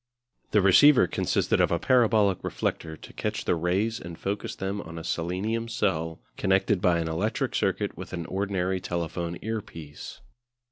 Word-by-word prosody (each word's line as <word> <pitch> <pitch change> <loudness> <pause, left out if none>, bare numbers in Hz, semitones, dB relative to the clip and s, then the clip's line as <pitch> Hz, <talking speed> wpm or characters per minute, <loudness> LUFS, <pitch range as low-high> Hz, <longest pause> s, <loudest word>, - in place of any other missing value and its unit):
The 105 - +3
receiver 120 +4 +7
consisted - - +1
of - - +3
a 85 - +2
parabolic 110 -4 +3
reflector 80 -1 -3
to - - -13
catch - - -3
the - - +2
rays 95 +7 0
and 85 -1 -8
focus 100 +1 -3
them 95 +2 -3
on 85 0 -9
a 80 - -6
selenium 95 +9 -2
cell 80 -8 -1 0.2
connected 95 0 +2
by 90 -2 +3
an 85 -1 -1
electric 100 +8 -1
circuit - - 0
with - - -8
an 85 -2 -4
ordinary 95 -1 -1
telephone 85 -1 -3
earpiece. 80 - -7
95 Hz, 155 wpm, -27 LUFS, 85-105 Hz, 0.2 s, receiver